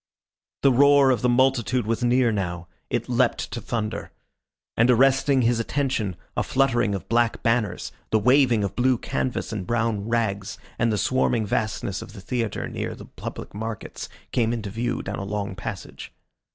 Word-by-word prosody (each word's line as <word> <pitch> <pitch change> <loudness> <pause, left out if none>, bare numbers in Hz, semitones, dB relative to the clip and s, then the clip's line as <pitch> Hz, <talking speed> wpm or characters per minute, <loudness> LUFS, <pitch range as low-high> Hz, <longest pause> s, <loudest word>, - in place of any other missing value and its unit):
The 135 - +6
roar 140 +1 +6
of 120 -5 +1
the 125 - +2
multitude 125 -1 +2
was 115 +2 -1
near 120 0 +3
now: 90 -4 -3 0.2
it - - -1
leapt - - +1
to - - -4
thunder. 110 -2 -3 0.6
And, 115 +2 +4
arresting 135 +1 +4
his 115 0 +2
attention, 115 -6 -1 0.2
a - - +1
fluttering 125 -6 +1
of 95 - -6
black 120 0 +1
banners, 115 -2 0 0.2
the 110 - +3
waving 125 -1 +4
of 100 - -3
blue 125 0 +3
canvas 130 -1 -3
and 95 -4 -4
brown 115 -3 0
rags, 105 -4 -1 0.2
and 115 0 +2
the 105 - 0
swarming 120 0 +1
vastness 105 -2 -2
of - - -10
the 100 - -10
theatre 115 0 -2
near - - -4
the - - -11
public - - -8
markets 110 +1 -6 0.2
came 115 -1 +1
into 110 -4 -4
view 120 +3 -2
down 100 +1 -4
a - - -4
long 100 0 -3
passage. 95 -1 -7
115 Hz, 170 wpm, -24 LUFS, 105-125 Hz, 0.6 s, The